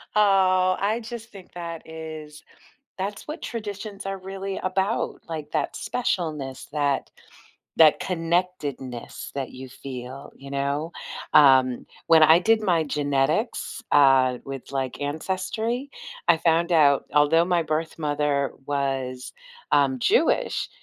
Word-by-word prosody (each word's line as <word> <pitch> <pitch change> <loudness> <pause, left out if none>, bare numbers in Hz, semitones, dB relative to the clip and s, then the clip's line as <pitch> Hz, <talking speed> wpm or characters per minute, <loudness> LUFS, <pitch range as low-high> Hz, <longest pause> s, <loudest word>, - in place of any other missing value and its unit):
Oh, 185 -3 +4
I 210 +4 0
just 230 0 -8
think 195 -3 -14
that 170 -2 -6
is 155 -2 -9 0.5
that's 200 +2 -5
what 305 +3 -6
traditions 205 -2 -6
are 195 0 -3
really 195 +1 -5
about, 190 +4 -1
like 160 -3 -6
that - - -1
specialness, 160 - -3
that 145 -2 0 0.7
that 155 -2 +6
connectedness 165 -8 -3
that 135 -2 -3
you 130 +1 -9
feel, 130 +1 -8
you 140 0 -11
know? 140 +4 -2 0.4
Um, 130 -4 +5 0.2
when 165 -1 +6
I 160 +1 +8
did 220 +3 +3
my 175 -6 +2
genetics, 145 - -1
uh, 135 -3 +5
with, 135 -1 -7
like, 135 -1 -3
Ancestry, 190 - -2 0.4
I 170 - +6
found 165 +1 +2
out 145 -4 +4
although 155 +3 +5
my 175 -2 +1
birth 155 +1 -2
mother 145 -2 0 0.2
was, 135 -3 -2 0.4
um, 140 -2 +3
Jewish, 120 - +1
160 Hz, 125 wpm, -24 LUFS, 140-190 Hz, 0.7 s, I